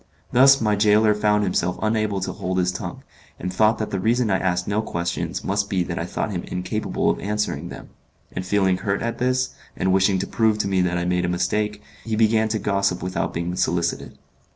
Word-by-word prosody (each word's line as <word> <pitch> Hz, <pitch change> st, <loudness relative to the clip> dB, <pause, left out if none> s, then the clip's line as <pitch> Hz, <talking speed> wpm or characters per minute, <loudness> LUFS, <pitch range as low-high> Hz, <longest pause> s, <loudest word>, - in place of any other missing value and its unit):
Thus 135 Hz, +2 st, +6 dB
my 105 Hz, -2 st, +2 dB
gaoler 105 Hz, +1 st, +4 dB
found 105 Hz, 0 st, +2 dB
himself 90 Hz, -2 st, 0 dB
unable 110 Hz, -2 st, 0 dB
to -, -, -2 dB
hold 95 Hz, 0 st, -3 dB
his 90 Hz, 0 st, +2 dB
tongue, 90 Hz, -, -6 dB, 0.4 s
and 90 Hz, +1 st, -4 dB
thought 110 Hz, +3 st, +3 dB
that 110 Hz, -, -4 dB
the 95 Hz, -, -1 dB
reason 115 Hz, +2 st, +1 dB
I 95 Hz, -, +2 dB
asked 90 Hz, -1 st, -1 dB
no 105 Hz, +1 st, +1 dB
questions 85 Hz, -5 st, -3 dB
must 100 Hz, +1 st, -1 dB
be 95 Hz, -2 st, +1 dB
that 85 Hz, -1 st, -4 dB
I 85 Hz, -, -3 dB
thought 105 Hz, -, -3 dB
him 90 Hz, -3 st, -3 dB
incapable 90 Hz, +4 st, -1 dB
of -, -, -4 dB
answering 105 Hz, +1 st, -2 dB
them; -, -, -10 dB, 0.4 s
and 90 Hz, -, -4 dB
feeling 95 Hz, -1 st, +2 dB
hurt 100 Hz, +2 st, -2 dB
at 115 Hz, 0 st, -3 dB
this, 130 Hz, +1 st, +1 dB, 0.3 s
and 95 Hz, 0 st, +1 dB
wishing 95 Hz, 0 st, +3 dB
to 95 Hz, -, -1 dB
prove 110 Hz, -2 st, +1 dB
to 105 Hz, -, -1 dB
me 95 Hz, -1 st, +1 dB
that 90 Hz, -1 st, 0 dB
I 90 Hz, -, -1 dB
made 90 Hz, 0 st, +1 dB
a -, -, -1 dB
mistake, 105 Hz, +4 st, -1 dB, 0.2 s
he 110 Hz, -1 st, -2 dB
began 110 Hz, 0 st, +3 dB
to 110 Hz, 0 st, -1 dB
gossip 100 Hz, -3 st, 0 dB
without 95 Hz, 0 st, -2 dB
being 85 Hz, +1 st, -3 dB
solicited. 85 Hz, -1 st, -1 dB
100 Hz, 215 wpm, -23 LUFS, 90-110 Hz, 0.4 s, Thus